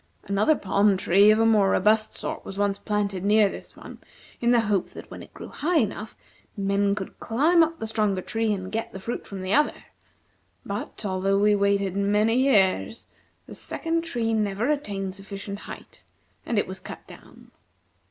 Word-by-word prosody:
Another 205 +10 +2
palm 200 -2 +2
tree 195 +2 +5
of 215 - +5
a 225 - +3
more 210 -3 +4
robust 215 +3 +2
sort - - -5
was 195 - -8
once 200 -1 0
planted 200 -3 -2
near 210 0 +4
this - - -10
one - - -11 0.4
in 235 - +1
the 240 -1 +5
hope 205 -4 0
that - - -12
when - - -8
it - - -13
grew - - -10
high 335 +3 0
enough, 215 -3 -2 0.4
men 200 0 +1
could 190 -2 -7
climb 310 +9 +3
up 325 0 +1
the 225 - -5
stronger 210 -4 0
tree 225 -1 -1
and 190 -2 -4
get 225 +1 -3
the 190 - -7
fruit 235 +5 -5
from 195 -2 -7
the 185 +2 -1
other. 295 +1 +2 0.8
But, - - -5
although 195 0 +1
we 210 +1 +4
waited 200 -2 +1
many 210 +3 +2
years 230 -4 +2 0.4
the - - -11
second 330 0 -2
tree 235 -9 -2
never 215 +4 0
attained 200 -10 -3
sufficient 200 +1 -7
height, - - -11 0.4
and 230 - -1
it 205 - +2
was 190 +1 -7
cut 190 - -10
down." - - -16
205 Hz, 180 wpm, -25 LUFS, 195-225 Hz, 0.8 s, tree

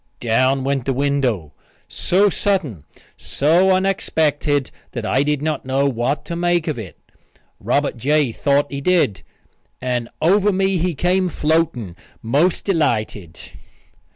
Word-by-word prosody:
Down 130 +3 +1
went 135 -2 -1
the 135 - 0
window 130 - -1 0.3
so 195 +3 +2
sudden, 175 - -1 0.3
so 170 +7 +2
unexpected 160 -7 +1 0.2
that 120 -3 -4
I 130 - +2
did 145 0 0
not 155 -1 -2
know 135 +2 0
what 135 +2 -1
to 170 - -5
make 175 -1 0
of 150 -6 -2
it. 100 -5 -9 0.6
Robert - - 0
J. 145 +2 +1
thought 140 +4 +1
he 140 0 -4
did, 165 - +1 0.6
and 125 -2 -2
over 200 +5 +3
me 190 -1 +1
he 175 0 -1
came 180 +4 +1
floating, 150 - -1 0.3
most 145 +10 +1
delighted. 110 - -1
145 Hz, 130 wpm, -20 LUFS, 125-175 Hz, 0.6 s, over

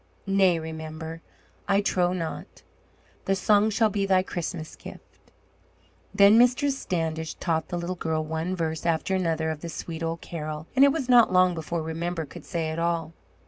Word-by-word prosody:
"Nay, 195 -3 +3
Remember, 160 0 -7 0.5
I 200 0 +3
trow 180 -3 +1
not. 170 -3 -5 0.6
The 195 - +2
song 205 +2 +3
shall 220 0 +2
be 195 0 -1
thy 185 -1 +3
Christmas 170 -3 -5
gift." - - -14 0.8
Then 205 +2 +6
Mistress 260 +3 +3
Standish 160 -7 -3
taught 160 -2 -1
the 175 - -3
little 175 +1 -3
girl 160 -2 -1
one 160 +4 -2
verse 160 -2 -3
after 165 +3 0
another 165 -4 0
of 155 -1 -6
the 170 - -6
sweet 165 +1 -6
old 165 0 -3
carol, 155 -2 -6
and 270 - +6
it 280 - +7
was 275 -4 -2
not 245 -5 +6
long 185 0 +4
before 165 0 -3
Remember 165 +1 -3
could - - -12
say 165 -3 -2
it 160 - -4
all. 165 -1 -1
170 Hz, 175 wpm, -26 LUFS, 160-195 Hz, 0.8 s, it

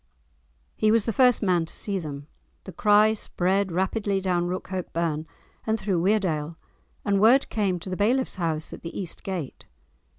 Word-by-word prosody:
He 215 - +2
was 225 -2 +3
the 225 - -1
first 250 0 +4
man 180 -4 +2
to - - -9
see 200 -2 0
them. 145 -4 -7 0.4
The 190 - -9
cry 210 +4 +4
spread 190 -2 0
rapidly 195 +3 0
down 180 -2 0
Rookhope 185 0 -4
burn 160 -2 -1 0.4
and 220 0 +1
through 190 -6 0
Weardale, 170 -6 0 0.5
and 200 -1 +2
word 245 +6 +5
came 200 -5 0
to 185 - -7
the - - -1
bailiff's 240 +4 +1
house 160 -3 -2
at - - -9
the 165 - -6
East 180 -4 -5
gate. 180 -8 -6
190 Hz, 170 wpm, -25 LUFS, 170-210 Hz, 0.5 s, word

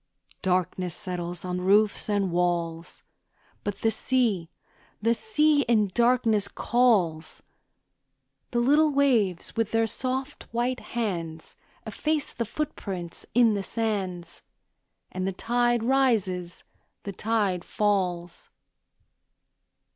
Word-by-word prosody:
Darkness 180 -1 0
settles 175 -1 -5
on 180 0 -2
roofs 205 +3 +3
and 200 -3 +1
walls, 170 -1 -1 0.6
But 205 -1 -4
the 225 - +2
sea, 220 -7 0 0.5
the 230 +2 +2
sea 305 - +2
in 215 -4 +3
darkness 235 -4 +3
calls; 195 -10 +1 1.1
The 240 - -3
little 295 +5 +4
waves, 245 - +1
with 225 -2 0
their 225 0 +2
soft, 260 +5 -4
white 245 +2 -1
hands, 170 -9 -4 0.3
Efface 305 -1 -2
the 235 - -2
footprints 195 - -5
in 235 -3 +5
the 200 - -1
sands, 190 -6 -3 0.7
And 185 0 -3
the 195 - -1
tide 240 +3 +1
rises, 220 -9 +1 0.4
the 200 - -5
tide 205 -4 0
falls. 180 -5 -1
210 Hz, 105 wpm, -26 LUFS, 180-240 Hz, 1.1 s, in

